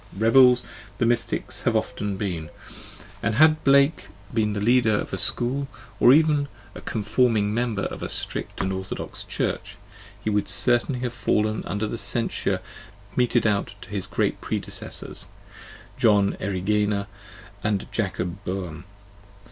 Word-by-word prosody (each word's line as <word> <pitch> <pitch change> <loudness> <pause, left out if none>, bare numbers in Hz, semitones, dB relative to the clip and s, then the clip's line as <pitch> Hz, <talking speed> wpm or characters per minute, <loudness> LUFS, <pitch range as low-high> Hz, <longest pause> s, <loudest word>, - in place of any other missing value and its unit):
Rebels 125 +3 +6 0.3
the 115 - +1
mystics 120 0 0
have - - +1
often 100 -2 -2
been, 85 -6 -3 0.7
and 105 +1 0
xvi - - -3
had 155 +1 +5
Blake 140 -2 +4 0.3
been 110 -2 +1
the 105 - -2
leader 115 0 +3
of - - -3
a - - 0
school, 135 +3 +1 0.3
or 120 - +7
even 150 -1 +4 0.3
a - - -9
conforming 110 -1 +1
member 115 -3 -1
of - - -4
a - - -4
strict - - -4
and 95 0 -1
orthodox 95 0 -5
church, 100 +3 -3 0.5
he 110 - 0
would 105 -1 0
certainly 125 +1 +1
have 120 -2 -2
fallen 110 +1 0
under 105 +5 -2
the 110 +2 -4
censure 115 -1 0 0.5
meted 120 -1 +2
out 100 -1 0
to - - -11
his 100 -2 -3
great 100 - -1
predecessors, - - -4 0.7
John 105 -5 +4
Erigena 100 +1 0 0.6
and 105 -2 0
Jacob 95 -3 -3
Boehme. 90 -3 -5
105 Hz, 140 wpm, -24 LUFS, 100-120 Hz, 0.7 s, or